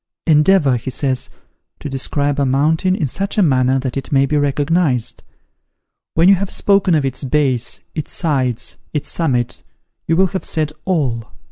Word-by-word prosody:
"Endeavour," 150 Hz, -4 st, +4 dB
he 120 Hz, -, -5 dB
says, 130 Hz, 0 st, -1 dB, 0.5 s
"to -, -, -6 dB
describe 140 Hz, +1 st, -1 dB
a 140 Hz, -, +2 dB
mountain 160 Hz, +7 st, +2 dB
in 160 Hz, -, -1 dB
such 195 Hz, -, -3 dB
a 205 Hz, -, +5 dB
manner 130 Hz, -4 st, +2 dB
that 130 Hz, -2 st, -3 dB
it 135 Hz, -1 st, -5 dB
may 135 Hz, -1 st, +4 dB
be 150 Hz, -, -1 dB
recognised. 145 Hz, -2 st, +1 dB, 0.9 s
When 165 Hz, +2 st, +4 dB
you 195 Hz, -, +8 dB
have 195 Hz, 0 st, -1 dB
spoken 195 Hz, -4 st, +2 dB
of 145 Hz, -3 st, +1 dB
its 135 Hz, +2 st, -4 dB
base, 135 Hz, -3 st, 0 dB
its 155 Hz, -, -5 dB
sides, 130 Hz, -8 st, -1 dB, 0.2 s
its 150 Hz, -, -2 dB
summit, 125 Hz, -8 st, -1 dB, 0.5 s
you 165 Hz, -, +2 dB
will 190 Hz, +1 st, +3 dB
have 190 Hz, -, -2 dB
said 155 Hz, -2 st, -2 dB
all! 130 Hz, -, -1 dB
145 Hz, 165 wpm, -18 LUFS, 130-165 Hz, 0.9 s, you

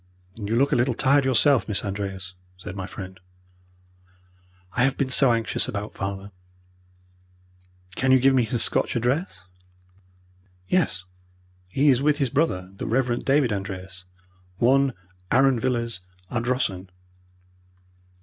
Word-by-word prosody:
"You 105 Hz, +1 st, -3 dB
look 140 Hz, +4 st, +2 dB
a -, -, +3 dB
little 120 Hz, 0 st, +1 dB
tired 140 Hz, +2 st, +3 dB
yourself, 130 Hz, +1 st, +3 dB
Miss 105 Hz, -1 st, -3 dB
Andreas," 95 Hz, -2 st, -5 dB, 0.2 s
said 90 Hz, +1 st, -8 dB
my 95 Hz, -2 st, -5 dB
friend. 95 Hz, -1 st, -9 dB, 1.5 s
"I 125 Hz, -, +2 dB
have 135 Hz, 0 st, +1 dB
been 130 Hz, -2 st, -1 dB
so 130 Hz, 0 st, +6 dB
anxious 115 Hz, +2 st, 0 dB
about 105 Hz, -4 st, -5 dB
father." 100 Hz, 0 st, -5 dB, 1.6 s
"Can 130 Hz, 0 st, +1 dB
you 130 Hz, -, +7 dB
give 135 Hz, +1 st, +4 dB
me 130 Hz, -2 st, +3 dB
his 115 Hz, +1 st, +1 dB
Scotch -, -, 0 dB
address?" 120 Hz, -, -1 dB, 1.2 s
"Yes, 180 Hz, -, 0 dB, 0.6 s
he 135 Hz, +11 st, +2 dB
is 130 Hz, -1 st, +3 dB
with 150 Hz, 0 st, +2 dB
his 135 Hz, -5 st, -1 dB
brother, 95 Hz, -, 0 dB
the -, -, -5 dB
Rev. 120 Hz, 0 st, 0 dB
David 135 Hz, -4 st, +2 dB
Andreas, 95 Hz, -2 st, -6 dB, 0.5 s
1, 135 Hz, +4 st, +3 dB, 0.4 s
Arran 130 Hz, -1 st, +3 dB
Villas, 115 Hz, -4 st, -2 dB, 0.3 s
Ardrossan." 120 Hz, -6 st, -1 dB
120 Hz, 130 wpm, -24 LUFS, 100-135 Hz, 1.6 s, you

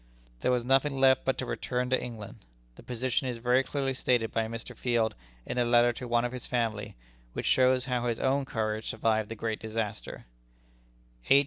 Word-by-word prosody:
There -, -, 0 dB
was 125 Hz, -1 st, +2 dB
nothing 135 Hz, +1 st, +2 dB
left 130 Hz, -1 st, +5 dB
but 130 Hz, -, +1 dB
to -, -, -2 dB
return 125 Hz, 0 st, -2 dB
to 130 Hz, -, +2 dB
England. 110 Hz, -5 st, -8 dB, 0.4 s
The -, -, -13 dB
position 125 Hz, +2 st, -1 dB
is 125 Hz, -2 st, -3 dB
very 125 Hz, +2 st, +3 dB
clearly 135 Hz, -1 st, -1 dB
stated 120 Hz, -3 st, +1 dB
by 115 Hz, -1 st, 0 dB
Mr. 115 Hz, 0 st, -6 dB
Field 115 Hz, -3 st, +1 dB, 0.3 s
in 125 Hz, -, -2 dB
a -, -, +4 dB
letter 120 Hz, 0 st, +4 dB
to 125 Hz, +1 st, -7 dB
one 120 Hz, 0 st, +2 dB
of 120 Hz, -, -2 dB
his 125 Hz, -1 st, -6 dB
family, 110 Hz, -4 st, -1 dB, 0.4 s
which -, -, -4 dB
shows 130 Hz, 0 st, +4 dB
how 125 Hz, -2 st, -1 dB
his 115 Hz, -2 st, -1 dB
own 135 Hz, +1 st, +1 dB
courage 110 Hz, -3 st, -2 dB
survived 110 Hz, -1 st, 0 dB
the 115 Hz, -, -5 dB
great 110 Hz, 0 st, -3 dB
disaster: 110 Hz, -1 st, -4 dB, 1.0 s
"H. 140 Hz, -, +8 dB
120 Hz, 195 wpm, -29 LUFS, 115-130 Hz, 1.0 s, H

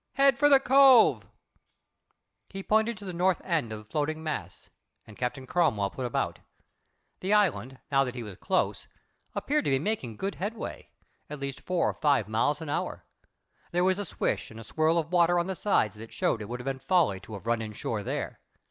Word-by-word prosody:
Head 275 Hz, -1 st, +4 dB
for 290 Hz, 0 st, +5 dB
the 275 Hz, -2 st, +7 dB
cove." 265 Hz, -2 st, +6 dB, 1.2 s
He 195 Hz, 0 st, -7 dB
pointed 220 Hz, +2 st, +2 dB
to 205 Hz, -, -10 dB
the 185 Hz, -, -5 dB
north 180 Hz, +1 st, +2 dB
end 160 Hz, -11 st, 0 dB
of 110 Hz, -, -4 dB
the 105 Hz, -, -12 dB
floating 155 Hz, +6 st, -2 dB
mass, 155 Hz, -1 st, -5 dB, 0.3 s
and 105 Hz, -, -13 dB
Captain 125 Hz, +3 st, -3 dB
Cromwell 115 Hz, -, +1 dB
put 130 Hz, -2 st, -4 dB
about. 120 Hz, -, -2 dB, 0.8 s
The 190 Hz, +3 st, 0 dB
island, 145 Hz, -10 st, +1 dB
now 135 Hz, 0 st, +4 dB
that 125 Hz, -1 st, -5 dB
he 120 Hz, -, -5 dB
was 105 Hz, -4 st, -9 dB
close, -, -, -1 dB, 0.5 s
appeared 300 Hz, +1 st, 0 dB
to -, -, +1 dB
be 135 Hz, -, +3 dB
making 135 Hz, -, -3 dB
good 195 Hz, +1 st, -2 dB
headway 210 Hz, +5 st, -6 dB, 0.4 s
at 150 Hz, -1 st, -6 dB
least 140 Hz, -1 st, -5 dB
four 180 Hz, -2 st, 0 dB
or -, -, 0 dB
five 140 Hz, -8 st, +2 dB
miles 115 Hz, +8 st, 0 dB
an 155 Hz, -, -7 dB
hour. -, -, -3 dB, 0.6 s
There 175 Hz, +1 st, +1 dB
was 185 Hz, +1 st, +2 dB
a 205 Hz, -, -3 dB
swish -, -, -2 dB
and 115 Hz, -, -11 dB
a -, -, -8 dB
swirl 155 Hz, +7 st, +1 dB
of 165 Hz, 0 st, -1 dB
water 175 Hz, 0 st, +4 dB
on 170 Hz, -, +1 dB
the 190 Hz, -, -2 dB
sides 110 Hz, -, +1 dB
that 115 Hz, +1 st, -10 dB
showed 115 Hz, -, 0 dB
it 105 Hz, -, -7 dB
would 125 Hz, +1 st, -4 dB
have 125 Hz, -, -8 dB
been 135 Hz, -1 st, -2 dB
folly 160 Hz, -, +2 dB
to 100 Hz, +3 st, -12 dB
have 100 Hz, +1 st, -8 dB
run 115 Hz, -1 st, +1 dB
in 110 Hz, -1 st, -5 dB
shore 105 Hz, 0 st, -3 dB
there. -, -, -4 dB
155 Hz, 210 wpm, -28 LUFS, 120-190 Hz, 1.2 s, the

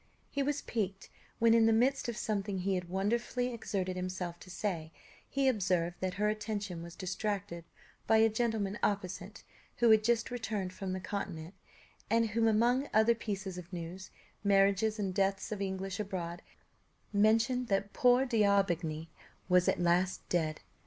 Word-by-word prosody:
He 280 Hz, -, -1 dB
was 285 Hz, +1 st, -1 dB
piqued 195 Hz, -4 st, -3 dB, 0.3 s
when, 230 Hz, 0 st, +5 dB
in 225 Hz, -1 st, +5 dB
the -, -, +5 dB
midst 245 Hz, +3 st, +2 dB
of 230 Hz, -, -4 dB
something 205 Hz, -2 st, -2 dB
he 190 Hz, +1 st, 0 dB
had 180 Hz, -2 st, -3 dB
wonderfully 235 Hz, +6 st, -1 dB
exerted 190 Hz, -5 st, -3 dB
himself 180 Hz, -1 st, -4 dB
to 185 Hz, -, -13 dB
say, 175 Hz, -4 st, -3 dB, 0.4 s
he 275 Hz, -1 st, +1 dB
observed 180 Hz, -7 st, +1 dB
that 185 Hz, -1 st, -2 dB
her 210 Hz, +2 st, +1 dB
attention 210 Hz, -4 st, -3 dB
was 170 Hz, 0 st, -9 dB
distracted 190 Hz, -3 st, -3 dB, 0.4 s
by 220 Hz, -, +5 dB
a 220 Hz, 0 st, +6 dB
gentleman 220 Hz, -3 st, -1 dB
opposite, 190 Hz, 0 st, -2 dB, 0.3 s
who 235 Hz, -2 st, +5 dB
had 220 Hz, -1 st, +6 dB
just 235 Hz, +1 st, +1 dB
returned 215 Hz, -6 st, -3 dB
from 190 Hz, -1 st, -4 dB
the 185 Hz, -, -3 dB
Continent, 185 Hz, -3 st, -5 dB, 0.6 s
and 230 Hz, +1 st, +3 dB
who, 225 Hz, +1 st, +2 dB
among 240 Hz, +5 st, +2 dB
other 220 Hz, +2 st, +6 dB
pieces 195 Hz, -5 st, -4 dB
of 175 Hz, 0 st, -12 dB
news, 175 Hz, +1 st, -6 dB, 0.3 s
marriages 200 Hz, +2 st, +3 dB
and 195 Hz, -3 st, -2 dB
deaths 195 Hz, +2 st, 0 dB
of 210 Hz, -2 st, -3 dB
English 190 Hz, 0 st, -3 dB
abroad, 175 Hz, -4 st, -4 dB, 0.7 s
mentioned 225 Hz, +4 st, +3 dB
that 200 Hz, 0 st, 0 dB
"poor 250 Hz, +1 st, +4 dB
D'Aubigny" 195 Hz, -9 st, +1 dB, 0.4 s
was 180 Hz, 0 st, +4 dB
at -, -, +2 dB
last 175 Hz, +1 st, +1 dB
dead. 155 Hz, -3 st, 0 dB
200 Hz, 160 wpm, -32 LUFS, 185-225 Hz, 0.7 s, a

